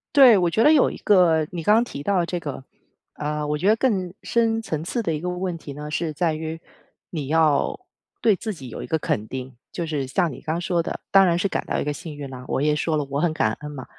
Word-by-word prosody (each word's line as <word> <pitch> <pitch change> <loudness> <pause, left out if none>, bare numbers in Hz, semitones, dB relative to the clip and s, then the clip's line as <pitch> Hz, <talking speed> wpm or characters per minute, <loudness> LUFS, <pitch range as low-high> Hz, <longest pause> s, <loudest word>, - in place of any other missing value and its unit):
对， 260 -6 +8
我 175 -2 +2
觉 220 +7 +2
得 300 - +7
有 305 -3 +5
一 - - -7
个 175 -6 +4
你 175 -2 -4
刚 210 +6 +4
刚 230 - +4
提 190 -12 -7
到 195 +5 +1
的 - - 0
这 175 +1 -3
个， 145 -5 -6 0.5
呃， 150 0 -3
我 150 - 0
觉 180 - -1
得 215 - +6
更 195 -8 0
深 225 -1 +1
层 155 -9 -3
次 230 +8 -2
的 165 - 0
一 150 - -2
个 175 - -5
问 180 -1 -2
题 145 -3 -9
呢， 150 +1 -7
是 160 0 -2
在 165 +1 0
于 160 +1 -4 0.5
你 150 -6 -4
要 155 -1 +2 0.4
对 220 - +5
自 215 +3 -4
己 135 -8 -10
有 - - -7
一 - - -7
个 160 - +1
肯 110 -8 -2
定。 130 0 -7 0.2
就 170 - -3
是 150 -4 -2
像 170 +4 +1
你 - - -9
刚 160 +2 -3
说 175 -1 +1
的， 165 - -5
当 195 0 +7
然 170 -2 +2
是 195 +3 0
感 - - -2
到 - - -1
一 - - -1
个 150 - -1
幸 155 +1 -7
运 145 -2 -7
了， 130 -1 -9
我 - - -1
也 150 +1 +3
说 160 +1 0
了 150 -2 0
我 140 +1 -1
很 160 0 +1
感 - - +1
恩 150 - -7
嘛。 135 -3 -8
165 Hz, 290 characters per minute, -23 LUFS, 150-185 Hz, 0.5 s, 对